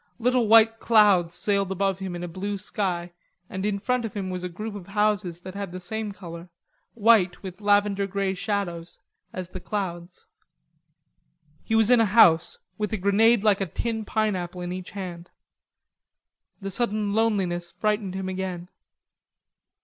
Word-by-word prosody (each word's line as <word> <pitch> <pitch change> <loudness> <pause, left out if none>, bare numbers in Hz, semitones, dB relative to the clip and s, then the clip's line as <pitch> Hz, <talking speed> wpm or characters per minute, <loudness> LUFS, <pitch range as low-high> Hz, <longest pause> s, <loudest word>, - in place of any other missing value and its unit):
Little 245 -1 +2
white 225 +1 +6
clouds 200 -7 +4
sailed 200 +1 0
above 195 0 0
him 190 -2 -5
in 175 - -5
a - - -3
blue 200 +4 -4
sky, 180 -3 -3 0.4
and 190 0 -4
in 205 -1 0
front 250 +4 -1
of 225 -2 -5
him 190 -2 -3
was 180 0 -4
a 180 - -3
group 210 +5 -6
of 200 -4 -9
houses 200 -4 0
that 185 +1 -8
had 200 -2 -5
the 185 - -6
same 215 +3 -4
color, 170 -3 -10 0.5
white 210 -5 +3
with 190 +1 -8
lavender 205 -1 +2
grey 195 0 -1
shadows, 180 -4 -3 0.3
as 185 -1 -6
the 185 - -7
clouds. 180 -3 -5 1.4
He 225 - -1
was 225 +1 +4
in 245 - +6
a 225 - +5
house, 175 -6 +5 0.2
with 210 -1 -1
a - - +1
grenade 205 +3 +3
like 205 -2 +3
a 195 - 0
tin 225 +6 -3
pineapple 185 -5 -2
in 175 0 -4
each 185 0 -7
hand. 180 -3 -7 1.3
The 195 0 -4
sudden 210 -1 -1
loneliness 190 -6 0
frightened 205 +1 -1
him 190 0 -3
again. 185 -2 -4
195 Hz, 165 wpm, -25 LUFS, 180-210 Hz, 1.4 s, white